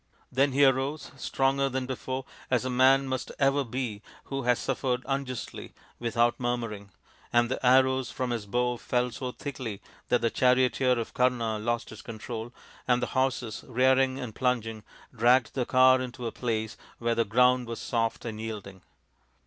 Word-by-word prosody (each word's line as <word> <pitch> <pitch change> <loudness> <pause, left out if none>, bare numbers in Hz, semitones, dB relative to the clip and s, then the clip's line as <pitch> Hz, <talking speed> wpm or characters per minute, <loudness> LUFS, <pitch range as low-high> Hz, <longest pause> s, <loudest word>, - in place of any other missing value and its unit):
Then 135 +1 +2
he 140 +1 +5
arose, 135 +3 0
stronger 135 +1 +1
than 130 0 -2
before, 130 0 -4 0.2
as 125 0 +1
a 130 - -1
man 130 +2 +5
must 130 -1 -3
ever 140 +1 +3
be 120 -4 -4 0.2
who 135 0 -4
has 125 -1 +2
suffered 130 -1 -1
unjustly 135 -2 -4 0.2
without 120 0 +1
murmuring, 115 -5 -3 0.4
and 120 0 +3
the 130 - -3
arrows 130 0 +4
from 130 -1 -3
his 115 -4 -3
bow 125 +3 0
fell 125 +1 0
so 125 +1 -5
thickly 125 -8 -6 0.3
that 125 - +3
the 115 - +1
charioteer 125 0 +3
of 115 - -4
Kama 120 -4 +1
lost 120 +2 -2
his 110 - -10
control, 115 +1 -6 0.4
and 125 -1 +3
the 120 - 0
horses, 130 -4 -1
rearing 130 +1 +3
and 125 -5 -5
plunging, 115 -4 -1 0.3
dragged 125 +3 +4
the 125 -3 -1
car 130 0 +5
into 125 -1 -6
a 115 - -2
place 110 -3 -3 0.2
where 115 0 0
the 115 - +2
ground 125 +3 +3
was 115 -1 -5
soft 115 -1 -1
and 110 -2 -5
yielding. 100 -4 -7
125 Hz, 165 wpm, -28 LUFS, 115-130 Hz, 0.4 s, he